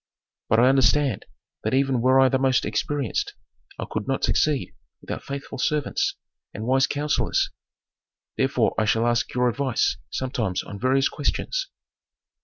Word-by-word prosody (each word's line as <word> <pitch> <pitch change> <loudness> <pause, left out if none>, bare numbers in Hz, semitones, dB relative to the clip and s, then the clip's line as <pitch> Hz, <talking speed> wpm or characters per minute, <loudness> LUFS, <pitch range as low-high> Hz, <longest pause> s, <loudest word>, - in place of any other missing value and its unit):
"But 115 - +4
I 125 - +6
understand 135 -2 +2 0.4
that - - 0
even 135 -2 +2
were 130 +2 +4
I 135 - +6
the 130 0 +1
most 130 -1 +2
experienced 145 - -2 0.4
I - - -4
could 105 -1 -4
not 135 - -1
succeed 150 -3 +1 0.3
without - - -6
faithful 140 -2 -7
servants 150 +1 0 0.4
and 110 - -5
wise 135 +2 +3
counsellors. 145 +1 0 0.8
Therefore - - +1
I 110 - +2
shall 110 +2 +2
ask 120 +2 +1
your 125 0 +3
advice 130 0 0
sometimes 115 -8 -2
on 100 - -9
various 135 +3 +3
questions." - - -2
130 Hz, 145 wpm, -24 LUFS, 120-140 Hz, 0.8 s, I